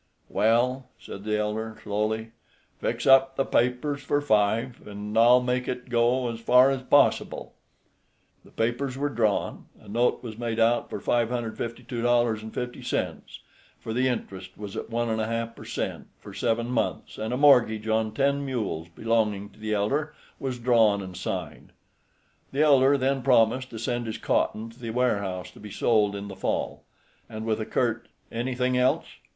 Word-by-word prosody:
"Well," 125 +4 +2
said 100 - -9
the 105 0 0
elder, 110 +1 -3
slowly, 110 +2 -2 0.5
"fix - - -2
up 135 0 +6
the 135 - +1
papers 125 +4 0
for 145 - +1
five, 115 -2 +1
an' 105 +1 -6
I'll 120 +2 +6
make 125 0 -1
it 125 0 -4
go 120 +2 +2
as 115 - -7
far 125 +3 +5
as 135 -1 -2
possible." 145 +2 +2 0.9
The - - -18
papers 125 +3 -2
were 145 +1 0
drawn. 110 -6 -1
A - - -18
note 120 +5 +1
was 115 -2 -7
made 115 -1 -2
out 115 +1 +2
for - - -5
$552.50, 120 0 -2 0.4
for 110 - -5
the 130 +2 +2
interest 95 -6 -4
was 105 -2 -7
at - - -5
one 120 0 -1
and 110 -1 -1
a 110 - -1
half 115 0 -3
per - - -11
cent. - - -4
for - - -11
seven 115 +1 -1
months, 120 - -2
and 110 +1 -3
a 125 - 0
mortgage 120 -6 +5
on 110 0 +1
ten 140 +4 +1
mules 115 - -3
belonging 105 +2 -1
to 105 - -21
the 110 0 -1
elder 145 +9 -1 0.2
was 130 -2 -3
drawn 115 -4 +3
and 95 -1 -8
signed. 90 - -5 0.8
The 140 +3 +2
elder 140 -1 +5
then 135 0 0
promised 125 0 +3
to 115 - -8
send 120 +1 -2
his 110 - -4
cotton 110 +1 -1
to 115 - -19
the 115 -2 -6
warehouse 100 -7 -1
to - - -16
be 105 - -9
sold 105 -1 +2
in 100 0 -6
the 95 - -8
fall, - - -3 0.4
and 110 0 -6
with 110 -1 0
a 110 - -4
curt 120 -1 -1 0.2
"Anything 125 +2 -1
else?" 125 +1 +2
115 Hz, 170 wpm, -26 LUFS, 110-125 Hz, 0.9 s, up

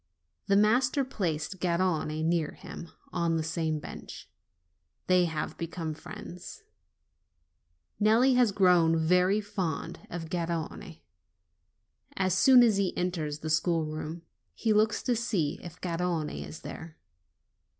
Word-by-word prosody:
The 200 - +3
master 250 +6 +3
placed 185 -5 -3
Garrone 170 -3 0
near 165 -2 0
him, 170 - -9 0.2
on 170 -2 +1
the 160 - -1
same 160 -1 -1
bench. 150 - -9 0.8
They 180 -1 +4
have 160 -2 -4
become 165 -1 -4
friends. 180 +2 -10 1.4
Nelli 230 +5 +5
has 245 -4 +4
grown 180 -4 +4
very 180 +5 +3
fond 190 -7 -4
of 165 -1 -6
Garrone. 170 0 -4 1.2
As 185 -2 +1
soon 245 +6 +7
as 220 -4 +4
he 195 -2 0
enters 160 -5 -2
the 155 - -4
schoolroom 160 0 -1 0.3
he 220 -2 +1
looks 215 +1 +2
to 245 - +1
see 195 -10 -1
if 175 0 -10
Garrone 170 -3 -2 0.2
is 155 - -10
there. 160 -1 -9
175 Hz, 120 wpm, -29 LUFS, 160-200 Hz, 1.4 s, soon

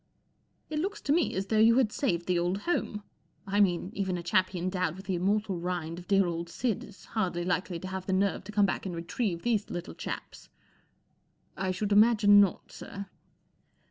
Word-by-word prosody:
" - - -44
It 305 - -1
looks 390 +5 -2
to 285 - +1
me 335 0 +1
as 190 +1 -1
though 215 +2 +1
you 230 +2 +6
had 245 -5 +3
saved 175 - -1
the 180 -1 +1
old 180 +3 -1
home. 210 -10 -2 0.4
I 200 +1 0
mean, 180 -1 +2
even 190 -2 -1
a 175 - -6
chappie 185 +2 +1
endowed 180 -1 -1
with 190 +1 -11
the 190 - -2
immortal 195 +1 0
rind 170 -1 -3
of 180 - -13
dear 195 -1 +4
old 170 0 -3
Sid 230 +3 -1
is 205 -1 -14
hardly 180 -5 -2
likely 180 0 -1
to 185 - -7
have 190 0 -5
the - - 0
nerve 195 +1 +1
to 210 - -7
come 205 -1 +4
back 195 - -2
and 180 - -4
retrieve 170 +1 -2
these 225 -4 0
little 175 +2 -5
chaps." - - -7 0.5
" - - -43 0.3
I 190 -1 -2
should 200 +3 -2
imagine 205 -1 +6
not, 195 -3 0
sir." 200 0 -8
190 Hz, 205 wpm, -29 LUFS, 180-210 Hz, 0.5 s, you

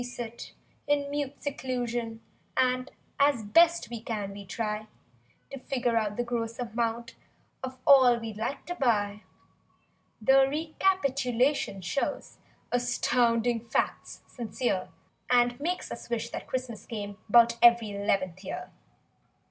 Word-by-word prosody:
io6 - - -2
We 245 0 -8
sit 235 -1 -7 0.4
in 285 -1 -1
mute 285 -1 -4
seclusion 240 -5 -3 0.4
and 255 0 +2 0.3
As 280 -5 +3
best 335 +11 +4
we 235 -2 -5
can, 210 -4 -4
we 200 0 -9
try 215 +1 -3 0.6
To 275 - -6
figure 250 -2 -1
just 215 -2 0
the 240 - +1
gross 230 -1 -3
amount 235 -1 -2 0.5
Of 260 0 -5
all 260 -4 +7
we'd 225 -2 -6
like 230 +6 -3
to 350 - -3
buy; 210 - +1 1.0
The 265 +4 +5
recapitulation 280 - 0
shows 180 +10 -3 0.3
Astounding 240 -1 +2
facts, - - -2
sincere— 235 -4 -2 0.4
And 245 0 +3
makes 350 +5 -3
us - - -7
wish 235 0 -2
that - - -6
Christmas 255 -4 -4
came 205 -3 -5
'Bout 235 +1 +6
ev'ry 235 -2 +6
'leventh 190 -2 -1
year. - - -6
240 Hz, 130 wpm, -28 LUFS, 225-260 Hz, 1.0 s, all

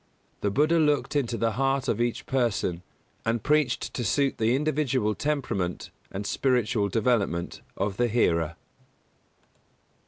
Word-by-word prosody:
The 100 - 0
Buddha 155 +10 +3
looked 150 -1 +1
into 120 -5 0
the 115 0 +1
heart 135 +3 0
of 115 -1 0
each 120 -1 -1
person, 115 -9 0 0.4
and 115 -1 -1
preached 150 -4 +1
to 125 - -2
suit 135 +6 +1
the 115 +2 +3
individual 135 -6 +1
temperament 125 -11 -2 0.2
and 100 +2 -5
spiritual 120 -4 +1
development 100 -5 0 0.2
of 100 0 -2
the 120 - +2
hearer. 85 -8 +1
120 Hz, 130 wpm, -27 LUFS, 105-135 Hz, 0.4 s, Buddha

